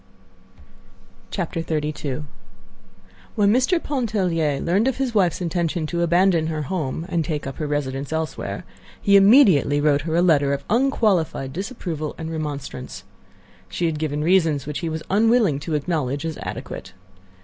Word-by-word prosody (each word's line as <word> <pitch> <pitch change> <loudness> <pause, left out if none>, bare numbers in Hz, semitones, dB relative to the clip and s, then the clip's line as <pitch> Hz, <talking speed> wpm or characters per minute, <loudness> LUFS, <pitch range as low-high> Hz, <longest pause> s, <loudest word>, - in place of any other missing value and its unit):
XXXII 155 -5 -3 1.1
When 205 0 +4
Mr. 260 +9 +2
Pontellier 185 - 0
learned 195 +8 +1
of 265 - 0
his 260 -3 -1
wife's 185 -5 +2
intention 170 -1 -1
to 170 +2 -2
abandon 170 -1 +3
her 155 -2 -2
home 160 -1 -3
and 170 -3 0
take 150 -2 -3
up 135 -1 -6
her 155 - -3
residence 140 -1 -3
elsewhere, 160 0 -3 0.4
he 200 -1 +3
immediately 195 - +6
wrote 145 -1 +3
her 160 +1 -2
a 175 - +3
letter 145 -5 +3
of 140 0 -4
unqualified 210 - +1
disapproval 175 - -4
and 160 0 -5
remonstrance. 145 -5 -5 0.7
She 175 - -2
had 160 -2 -1
given 150 -1 -2
reasons 165 -5 +2
which 150 0 -4
he 170 - -3
was 160 0 -4
unwilling 215 - +3
to 155 +2 -3
acknowledge 145 -2 -1
as 160 -1 -4
adequate. 95 - -7
160 Hz, 145 wpm, -22 LUFS, 150-190 Hz, 1.1 s, immediately